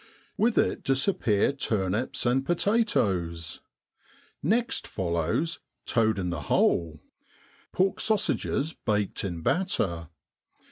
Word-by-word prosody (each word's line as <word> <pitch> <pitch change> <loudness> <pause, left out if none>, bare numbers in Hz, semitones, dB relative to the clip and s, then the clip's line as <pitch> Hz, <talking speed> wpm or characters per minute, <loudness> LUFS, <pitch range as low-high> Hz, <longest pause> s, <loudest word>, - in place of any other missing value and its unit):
With 230 +2 +1
it - - +1
disappear 135 - +2
turnips 110 -2 -1
and 125 +2 +2
potatoes. 100 - 0 0.8
Next 240 +4 0
follows 85 - -1
* - - -55
toad 110 -3 +2
in 90 -2 -2
the 85 - -3
hole 80 -3 +1 0.7
'pork 190 +1 +1
sausages 165 -7 0
baked 105 -3 -1
in 85 -4 -4
batter. 85 - 0
110 Hz, 100 wpm, -27 LUFS, -, 0.8 s, disappear